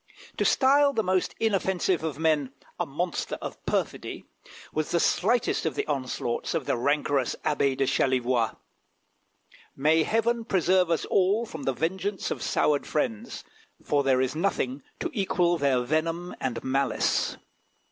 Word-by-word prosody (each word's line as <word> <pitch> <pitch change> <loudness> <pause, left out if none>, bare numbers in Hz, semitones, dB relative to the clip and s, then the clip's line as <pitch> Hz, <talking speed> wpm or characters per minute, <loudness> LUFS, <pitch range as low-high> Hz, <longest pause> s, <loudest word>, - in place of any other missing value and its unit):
To - - +1
style 280 +1 +4
the 225 -3 +1
most 185 -1 0
inoffensive 190 -5 +1
of 155 -4 -3
men 150 -4 +1 0.3
"a - - -1
monster 170 +5 -3
of - - -7
perfidy" - - -2 0.5
was 155 0 -1
the 170 - +2
slightest 245 +7 +2
of 160 -5 -1
the - - -1
onslaughts 130 -4 -2
of - - -1
the - - +1
rancorous 140 0 +1
Abbé 140 -3 +1
of 135 - +2
Chalivoix. 125 -3 +1 1.2
May 155 +4 +3
Heaven 230 +5 +1
preserve 185 -3 +2
us 165 - 0
all 200 +5 +2
from 160 -9 -8
the 135 - +1
vengeance 190 +7 -2
of - - -3
soured 150 -2 +1
friends, 235 -3 -2 0.4
for 145 -1 +2
there 135 -2 +2
is 130 +2 -1
nothing 145 -6 -1 0.2
to - - -3
equal 175 -5 +1
their 135 -3 +2
venom 165 +6 -1
and 130 -2 -2
malice! 135 +1 0
160 Hz, 145 wpm, -27 LUFS, 135-190 Hz, 1.2 s, style